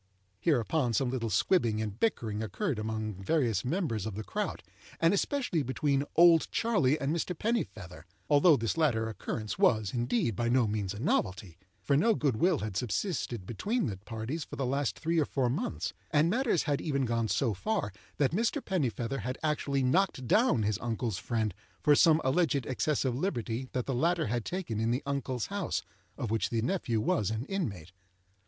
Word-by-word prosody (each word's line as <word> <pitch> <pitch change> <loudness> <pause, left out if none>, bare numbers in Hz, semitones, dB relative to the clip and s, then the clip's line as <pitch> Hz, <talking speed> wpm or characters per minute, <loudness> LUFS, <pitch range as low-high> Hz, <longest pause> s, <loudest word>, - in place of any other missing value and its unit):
'" 95 +1 -42
Hereupon 130 -2 +2
some 125 +2 +1
little 120 -3 -2
squibbing 115 - +2
and 110 0 -4
bickering 110 - 0
occurred 130 - -2
among 110 -2 -3
various 115 - +1
members 125 - -1
of 105 - -5
the 110 - -4
crowd, - - -3 0.4
and 165 +3 +4
especially 205 - 0
between 135 +2 0
"Old 170 -1 +6
Charley" 160 - +2
and 140 +3 0
Mr. 170 +1 -2
Pennifeather—although 110 - +1
this 115 +6 -2
latter 120 -9 +2
occurrence 110 - -4
was, 110 - +3
indeed, 120 -2 0
by 120 +4 0
no 125 0 +4
means 105 -2 -2
a - - -7
novelty, 95 -5 -1 0.2
for 140 - +2
little 220 +10 +4
good 140 -10 0
will 175 +5 +3
had 105 -5 -4
subsisted 120 - -2
between 210 - -1
the 105 -7 -3
parties 115 - -5
for - - -9
the 135 - -2
last 140 +1 -1
three 165 +1 0
or 150 - +3
four 130 -4 0
months; 225 - -3 0.2
and 155 +2 +3
matters 235 - +1
had 145 -2 0
even 140 -4 0
gone 115 -1 0
so 120 0 +1
far 185 - -2 0.2
that 140 -3 +2
Mr. 230 - 0
Pennifeather 135 - -2
had 125 +5 -4
actually 140 -3 0
knocked 135 -1 +1
down 215 - +3
his 105 -1 0
uncle's 115 -4 -2
friend 110 -2 -1 0.3
for 150 - +4
some 160 +1 +6
alleged 140 -2 +1
excess 140 +2 0
of 130 - +1
liberty 125 - -2
that 125 -2 -1
the 135 - -2
latter 165 +6 +1
had 120 0 -2
taken 175 - -3
in 115 +1 +1
the 125 +4 0
uncle's 135 -4 -2
house, 200 - -1 0.3
of 120 -6 -3
which 115 - 0
the 115 -2 -1
nephew 120 - 0
was 105 -1 +1
an 110 +3 -3
inmate. 105 - -4
130 Hz, 185 wpm, -30 LUFS, 110-160 Hz, 0.4 s, Old